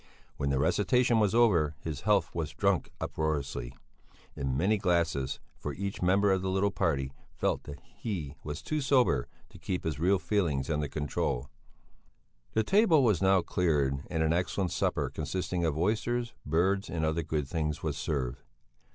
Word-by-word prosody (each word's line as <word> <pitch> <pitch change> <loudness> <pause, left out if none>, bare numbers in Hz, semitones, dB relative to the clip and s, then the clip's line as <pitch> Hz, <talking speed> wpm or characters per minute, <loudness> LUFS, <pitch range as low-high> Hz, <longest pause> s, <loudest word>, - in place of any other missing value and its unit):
When 70 - -1
the 70 - +1
recitation 120 - +3
was 105 0 +2
over, 85 -11 +4
his 75 -2 -5
health 100 -5 +2
was 75 -3 -3
drunk 100 +1 +1
uproariously, 70 -5 -2 0.6
in 65 -1 -2
many 100 +6 +2
glasses, 85 -7 0 0.2
for - - -4
each 100 +1 -4
member 95 +3 +3
of 95 -1 +2
the 95 - -2
little 95 +2 +1
party 70 -8 0 0.2
felt - - -1
that 75 - -8
he 85 -11 -5
was 75 +1 -5
too 155 -1 -1
sober 125 - +3 0.2
to - - -14
keep 90 - -3
his 75 -3 -2
real 95 +4 +3
feelings 85 -9 0
under 75 -1 0
control. 70 -4 -2 1.0
The 110 - +2
table 190 - +4
was 105 -9 +3
now 95 -2 +4
cleared 70 -6 +1
and 80 -2 0
an 80 0 +2
excellent 90 +1 0
supper - - 0
consisting 85 +3 -2
of 80 -2 0
oysters, 115 +6 0
birds, 95 +6 +1
and 80 -2 -1
other 80 +2 0
good 75 -2 -2
things, 75 -1 -2
was - - -1
served. 70 -3 -2
85 Hz, 165 wpm, -30 LUFS, 75-100 Hz, 1.0 s, over